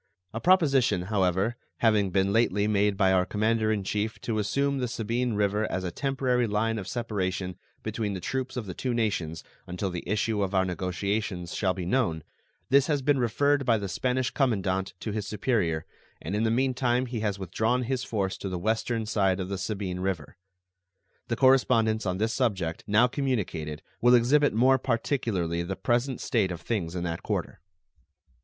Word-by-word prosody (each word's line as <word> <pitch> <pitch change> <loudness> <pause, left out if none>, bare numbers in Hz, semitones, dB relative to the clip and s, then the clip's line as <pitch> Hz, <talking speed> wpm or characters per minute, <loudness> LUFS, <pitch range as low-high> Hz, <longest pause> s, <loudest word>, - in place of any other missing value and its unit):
A 115 - -3
proposition, 140 - +3
however, 95 +3 +1 0.2
having 105 -4 +3
been 95 +1 +1
lately 105 -3 +2
made 105 -1 +2
by 95 -2 +4
our 95 -1 +4
commander 110 +2 +1
in 105 -2 -1
chief 105 +3 -2
to 110 -2 -1
assume 140 +6 0
the 125 - 0
Sabine 115 +1 -1
River 105 +1 0
as 95 - -2
a 90 - -3
temporary 130 -2 0
line 110 +2 0
of 95 - -7
separation 95 -6 -2 0.3
between 110 -1 -2
the - - -4
troops 130 +6 -3
of 120 - -3
the 90 - -6
two 125 +3 -2
nations 85 -9 -1 0.2
until 90 +1 -3
the 90 - -4
issue 105 0 0
of 100 0 -1
our 95 0 +3
negotiations 95 0 -2
shall 95 -3 0
be 90 -2 -4
known, 90 - 0 0.5
this 140 +1 +5
has 145 -4 0
been 140 0 +3
referred 140 +4 +2
by 120 -4 +3
the 100 -2 -4
Spanish 125 +5 -1
commandant 95 -7 0
to 110 - -3
his 105 0 -3
superior, 100 -8 0 0.3
and 95 +6 -4
in 110 +2 +1
the - - +2
mean 130 +3 +2
time 125 0 +1
he 120 -2 -4
has 105 -2 -1
withdrawn 110 +7 0
his 125 0 -2
force 100 -5 -2
to 100 - -4
the 90 - -3
western 110 +3 -1
side 100 -3 +1
of 95 0 -3
the 100 - -2
Sabine 95 -2 -3
River. 90 -6 -3 0.9
The 115 - -1
correspondence 115 -5 +3
on 90 0 -1
this 110 +3 0
subject 95 -10 -1
now 105 +4 +5
communicated 110 - -2 0.2
will 120 +1 +6
exhibit 145 +5 +4
more 130 +4 +4
particularly 115 - -1
the 90 +3 -3
present 120 +4 0
state 115 -8 +1
of 90 -2 -5
things 90 -7 -2
in 90 - -2
that 85 -1 -3
quarter. - - -3
110 Hz, 185 wpm, -27 LUFS, 95-120 Hz, 0.9 s, will